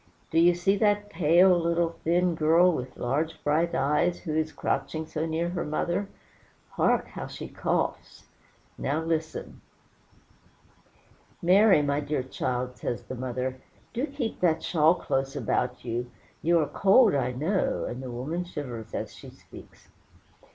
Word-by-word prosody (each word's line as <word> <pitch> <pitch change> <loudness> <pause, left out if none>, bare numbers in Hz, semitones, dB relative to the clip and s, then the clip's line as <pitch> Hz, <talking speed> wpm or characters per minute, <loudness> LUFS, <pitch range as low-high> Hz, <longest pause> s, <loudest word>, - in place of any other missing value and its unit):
Do 165 - +3
you 175 +1 +5
see 195 +3 +1
that 205 -1 +1
pale, 175 +3 +5
little, 170 0 +1
thin 175 +1 +2
girl, 165 +3 +4
with 130 -4 -5
large, 145 +6 -1
bright 160 +3 +1
eyes, 150 +5 +1
who 155 -4 -3
is 155 0 0
crouching 160 0 -2
so 155 +1 -3
near 165 +2 -1
her 175 - -3
mother? 175 +6 -2 0.6
hark! - - +1
how - - -6
she - - -7
coughs. - - -3 0.5
Now 150 +4 -1
listen. 160 -1 -3 1.8
"Mary, 190 -2 +5
my 140 0 0
dear 145 -2 -2
child," 125 -1 -3
says 120 - -4
the - - -7
mother, 130 +1 -4 0.3
"do 250 +5 -1
keep 270 -6 -4
that 165 -3 +2
shawl 160 0 +4
close 135 -3 -2
about 125 -1 -1
you; 120 +1 -3 0.3
you 170 +1 +3
are 155 -3 +2
cold, 200 - +5
I 125 -3 0
know," 160 +10 0
and 125 +2 -5
the 130 - -6
woman 140 +9 -3
shivers 125 -10 -7
as - - -4
she - - -11
speaks. - - -16
160 Hz, 150 wpm, -27 LUFS, 135-175 Hz, 1.8 s, you